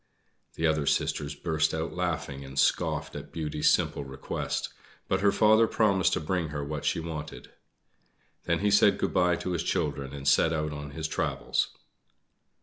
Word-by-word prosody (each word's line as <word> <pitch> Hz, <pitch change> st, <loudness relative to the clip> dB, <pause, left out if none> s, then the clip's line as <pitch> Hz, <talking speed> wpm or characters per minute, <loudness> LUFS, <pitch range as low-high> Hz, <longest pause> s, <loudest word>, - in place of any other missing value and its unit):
The 80 Hz, -, -1 dB
other 80 Hz, -3 st, +1 dB
sisters 70 Hz, -1 st, 0 dB
burst 80 Hz, 0 st, 0 dB
out 80 Hz, +1 st, -3 dB
laughing 80 Hz, -6 st, -3 dB
and 65 Hz, 0 st, -10 dB
scoffed -, -, +1 dB
at -, -, -8 dB
Beauty's 75 Hz, -2 st, 0 dB
simple 70 Hz, -, +1 dB
request; 65 Hz, 0 st, -4 dB, 0.4 s
but -, -, 0 dB
her 100 Hz, 0 st, +4 dB
father 110 Hz, +2 st, +5 dB
promised 100 Hz, -5 st, +2 dB
to -, -, +1 dB
bring 85 Hz, +1 st, -1 dB
her 75 Hz, -1 st, -4 dB
what 75 Hz, 0 st, -5 dB
she -, -, +1 dB
wanted. 80 Hz, -2 st, -7 dB, 0.9 s
Then 85 Hz, +1 st, 0 dB
he 105 Hz, 0 st, +2 dB
said 105 Hz, 0 st, +5 dB
good -, -, -1 dB
bye 90 Hz, -1 st, +3 dB
to 90 Hz, -, -4 dB
his 85 Hz, -, -1 dB
children 70 Hz, -1 st, -2 dB
and 70 Hz, -1 st, -6 dB
set 80 Hz, +4 st, +4 dB
out 75 Hz, -1 st, -2 dB
on 75 Hz, 0 st, -6 dB
his 75 Hz, +2 st, -4 dB
travels. -, -, -1 dB
80 Hz, 170 wpm, -28 LUFS, 75-90 Hz, 0.9 s, father